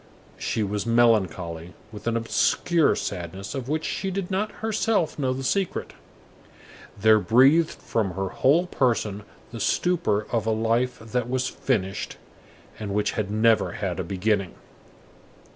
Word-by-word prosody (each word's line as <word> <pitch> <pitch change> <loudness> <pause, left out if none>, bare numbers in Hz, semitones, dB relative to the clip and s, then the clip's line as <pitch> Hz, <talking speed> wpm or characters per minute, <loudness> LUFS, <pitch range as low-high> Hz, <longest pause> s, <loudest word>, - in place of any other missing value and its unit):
She 110 - -1
was 105 +2 -2
melancholy 95 -8 +1 0.2
with 105 +1 -9
an 115 0 +1
obscure 155 +7 +2
sadness 95 +1 -5
of 130 -2 -5
which 155 +1 -1
she 195 - -2
did 190 0 -4
not 210 +3 -1
herself 220 -7 0
know 130 -2 +1
the 130 +1 -3
secret. 190 +7 -1 1.0
There 110 +2 +5
breathed 135 +10 +5
from 105 -5 -2
her 95 0 -2
whole 155 - +3
person 115 - 0 0.3
the 115 - -7
stupor 110 - +1
of 115 -2 0
a - - +3
life 115 +3 +1
that 115 +2 -3
was 130 0 0
finished, 100 -8 -2 0.6
and 100 -2 -4
which 105 0 +1
had 105 -2 -3
never 110 +1 +2
had 95 -4 -3
a - - -1
beginning. 95 +2 -1
115 Hz, 145 wpm, -25 LUFS, 100-135 Hz, 1.0 s, There